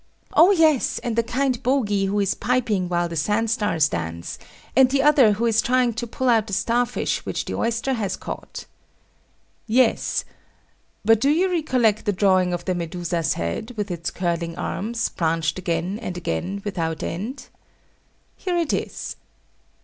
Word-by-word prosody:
Oh 345 - +7
yes, 320 -8 +3
and 235 -2 -2
the 230 - +3
kind 250 +2 -1
bogie 210 -7 +1
who 200 +2 0
is 200 -2 +1
piping 225 -8 0
while 175 -1 +1
the 170 - -6
sandstars 210 -2 +1
dance; 85 - -5 0.4
and 260 0 +6
the 270 0 +2
other 280 -7 +6
who 225 +4 -1
is 225 -1 +3
trying 250 0 +2
to 235 +2 -4
pull 260 +3 -3
out 225 -3 +3
the 200 - -6
star 240 +5 +1
fish - - -2
which - - -3
the - - -4
oyster 230 +3 -1
has 210 -6 -2
caught. - - -7 1.0
Yes. 235 +1 +2 0.8
But 225 0 +5
do 275 - +3
you 360 +5 +2
recollect 255 - +1
the 205 - +1
drawing 185 -2 +3
of 175 - -3
the 185 - 0
Medusa's 170 -1 -2
head, 85 - -4
with 205 -2 -2
its 170 -1 -3
curling 170 -2 -2
arms, 225 +3 -2
branched 165 -1 -1
again 175 +3 -2
and 180 -6 -5
again 175 - -3
without 165 -6 -2
end? 215 - -5 0.9
Here 360 -2 -2
it 335 -3 0
is. - - -4
215 Hz, 165 wpm, -23 LUFS, 175-250 Hz, 1.0 s, Oh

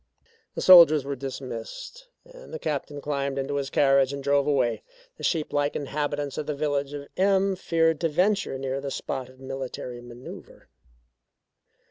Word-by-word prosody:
The - - -3
soldiers 165 -6 +8
were 140 0 -3
dismissed, 135 - -7 0.2
and - - -14
the 480 - -4
Captain 145 - -4
climbed 140 -2 -2
into 140 +1 -2
his 140 -1 -2
carriage 135 -1 +3
and 140 -1 -6
drove 140 0 +2
away. 130 -5 +1 0.4
The - - -11
sheep 160 -4 -1
like 145 0 0
inhabitants 145 0 -3
of 150 - -5
the 150 - -2
village 140 -1 -1
of 140 -1 -7
M 195 0 +3
feared 165 -3 +1
to 165 - +1
venture 190 -1 +1
near 135 0 -3
the 140 - -4
spot 130 -1 -4
of 130 0 -18
military 130 -2 -6
manoeuvre. 120 +1 -12
140 Hz, 160 wpm, -26 LUFS, 135-160 Hz, 0.4 s, soldiers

